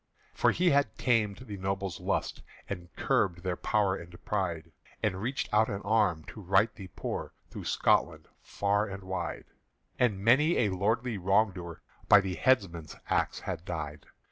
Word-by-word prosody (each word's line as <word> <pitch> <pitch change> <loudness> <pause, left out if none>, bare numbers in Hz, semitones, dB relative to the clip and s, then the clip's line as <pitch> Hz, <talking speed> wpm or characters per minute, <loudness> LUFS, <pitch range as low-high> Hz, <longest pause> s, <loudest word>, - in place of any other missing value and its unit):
For - - +3
he 180 0 +3
had 140 0 +2
tamed 110 -5 +1
the 105 -4 -7
nobles' 95 -2 -3
lust - - -2 0.3
And 90 -3 -6
curbed 85 -2 +1
their 90 -1 -1
power 100 -1 +1
and 85 -1 -11
pride, 85 -5 -2 0.3
And 95 -3 0
reached 130 +5 -2
out 110 +1 +4
an 100 0 -4
arm 100 -7 +2
to 110 - -9
right 100 +4 +3
the 95 - -9
poor - - -4 0.2
Through - - -7
Scotland - - +1
far 100 +1 0
and 95 -1 -7
wide; 95 0 -4 0.5
And 120 -6 +3
marry 150 +8 +5
a 110 - +3
lordly 110 +4 0
wrong 95 +3 +3
doer 85 -3 -9 0.3
By 100 - +9
the 95 -2 -2
headsman's 90 -9 +1 0.2
axe - - +1
had 80 - -4
died. 75 -4 -5
100 Hz, 165 wpm, -30 LUFS, 90-110 Hz, 0.5 s, By